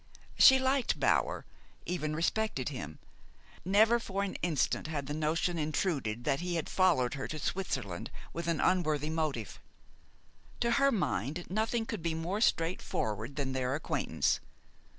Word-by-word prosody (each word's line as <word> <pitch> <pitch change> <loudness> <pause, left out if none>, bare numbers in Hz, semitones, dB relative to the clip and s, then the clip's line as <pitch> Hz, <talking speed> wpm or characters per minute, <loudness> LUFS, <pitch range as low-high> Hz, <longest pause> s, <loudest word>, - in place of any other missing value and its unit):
She 265 - +8
liked 265 0 +1
Bower, - - +1 0.4
even 155 -4 -2
respected 170 - 0
him. 80 - -6 0.7
Never 220 +6 +4
for 200 -3 -2
an 200 - -3
instant 160 -3 0
had 150 -3 -3
the 145 - -4
notion 160 +3 0
intruded 145 - -1
that 135 - +1
he 175 0 -2
had 165 - -2
followed 170 -10 +3
her 135 -2 -4
to 155 - -5
Switzerland 135 - -3 0.2
with 170 0 -4
an 165 -2 +1
unworthy 155 -5 +1
motive. 155 -9 -2 1.0
To 235 0 +2
her 275 +2 +4
mind, 175 - -1
nothing 225 +3 0
could 220 -5 -4
be 165 -1 -1
more 175 +6 -2
straightforward 135 - 0
than 135 -2 -2
their 130 0 -1
acquaintance. 155 - 0
165 Hz, 145 wpm, -31 LUFS, 140-195 Hz, 1.0 s, She